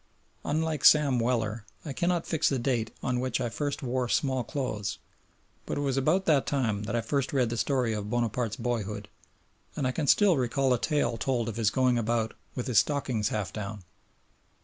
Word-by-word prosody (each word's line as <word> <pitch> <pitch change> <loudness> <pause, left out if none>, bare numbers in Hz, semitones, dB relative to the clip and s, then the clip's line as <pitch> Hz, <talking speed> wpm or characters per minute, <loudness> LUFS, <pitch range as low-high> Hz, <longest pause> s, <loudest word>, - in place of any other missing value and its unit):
Unlike 155 0 -1
Sam 145 -5 +6
Weller, 115 -2 0 0.2
I 145 - -4
cannot 175 +3 0
fix 160 -2 +1
the 135 - 0
date 120 -3 0
on 125 -1 0
which 130 -1 -1
I 120 -2 -1
first 145 +6 -3
wore 125 -1 -1
small 130 -2 +1
clothes, 110 -6 -3 0.7
but - - -2
it - - -1
was 135 -2 0
about 155 +8 +2
that 145 -4 +3
time 110 -7 0
that 115 - -2
I 120 - +1
first 135 +3 -1
read 125 -5 +1
the - - -1
story 125 -3 +1
of 105 -1 -4
Bonaparte's 120 -1 -1
boyhood, 105 -5 -3 0.7
and 140 - -1
I 130 - +2
can 145 +2 -2
still 195 -2 +5
recall 130 +1 +1
a 120 - 0
tale 145 -6 0
told 120 +1 -1
of 115 - -4
his 110 -3 +3
going 125 0 +2
about 115 0 0 0.2
"with 125 - -3
his 125 -7 +4
stockings 125 - 0
half 105 -3 -3
down." 105 -2 -6
125 Hz, 195 wpm, -28 LUFS, 115-140 Hz, 0.7 s, Sam